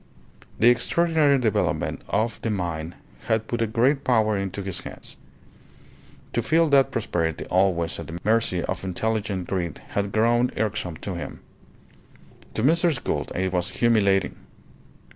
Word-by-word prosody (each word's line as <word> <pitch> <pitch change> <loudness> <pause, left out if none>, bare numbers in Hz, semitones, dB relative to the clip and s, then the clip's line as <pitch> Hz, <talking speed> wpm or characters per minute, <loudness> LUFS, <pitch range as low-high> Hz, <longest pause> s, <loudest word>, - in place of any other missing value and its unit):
The 120 - +6
extraordinary 150 +4 +3
development 115 -5 0
of 110 +3 -1
the 115 - -2
mine 85 -5 -3 0.3
had 110 0 +1
put 120 -1 -2
a 115 - +2
great 130 +5 +2
power 110 -4 +2
into 100 0 -3
his 95 -2 -4
hands. - - -10 1.2
To - - +1
feel 165 0 +3
that 140 -2 +5
prosperity 80 -7 -2
always 90 -3 +1
at 85 - -7
the 85 - -6
mercy 105 -5 +1
of - - -3
unintelligent 100 0 -2
greed 90 -4 -3
had 100 0 -2
grown 120 +3 +3
irksome 105 -6 -2
to 100 - -3
him. 85 - -7 1.1
To 110 - -1
Mrs. 165 -1 +2
Gould - - -2
it 95 0 -1
was 90 0 0
humiliating. 100 -3 +2
105 Hz, 145 wpm, -24 LUFS, 90-120 Hz, 1.2 s, The